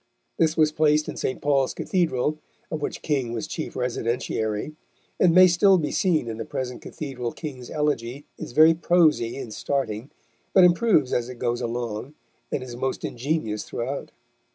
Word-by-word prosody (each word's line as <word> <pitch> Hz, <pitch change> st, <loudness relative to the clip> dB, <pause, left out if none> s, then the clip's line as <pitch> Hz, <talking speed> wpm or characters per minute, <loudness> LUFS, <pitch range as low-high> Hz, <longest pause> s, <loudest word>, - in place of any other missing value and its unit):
This 160 Hz, 0 st, +2 dB
was 155 Hz, -1 st, +4 dB
placed 150 Hz, 0 st, +2 dB
in -, -, -5 dB
St. 130 Hz, -, -2 dB
Paul's 140 Hz, -2 st, +2 dB
Cathedral, 155 Hz, -5 st, 0 dB, 0.3 s
of 155 Hz, -2 st, -3 dB
which -, -, -4 dB
King 135 Hz, -6 st, -1 dB
was 120 Hz, -, -3 dB
chief 160 Hz, +1 st, -5 dB
residentiary, 115 Hz, 0 st, -2 dB, 0.4 s
and 180 Hz, -, +5 dB
may 185 Hz, +2 st, +8 dB
still 190 Hz, +2 st, +5 dB
be 150 Hz, -4 st, -1 dB
seen 165 Hz, -9 st, +1 dB
in 110 Hz, -1 st, -4 dB
the 115 Hz, -, -3 dB
present 125 Hz, +2 st, -5 dB
Cathedral 125 Hz, -5 st, -5 dB
King's 130 Hz, -6 st, -7 dB
elegy 145 Hz, -3 st, -2 dB
is -, -, -7 dB
very 155 Hz, +5 st, +7 dB
prosy 160 Hz, -8 st, +3 dB
in 120 Hz, -5 st, -6 dB
starting, 125 Hz, -1 st, -2 dB, 0.4 s
but 190 Hz, -, +7 dB
improves 175 Hz, -, +4 dB
as 120 Hz, 0 st, 0 dB
it 125 Hz, -, -7 dB
goes 120 Hz, 0 st, -1 dB
along, 120 Hz, +3 st, -4 dB, 0.4 s
and 130 Hz, -, -2 dB
is 125 Hz, -2 st, -8 dB
most 130 Hz, +2 st, -2 dB
ingenious 120 Hz, -4 st, -2 dB
throughout. 130 Hz, +4 st, -4 dB
140 Hz, 165 wpm, -25 LUFS, 120-155 Hz, 0.4 s, may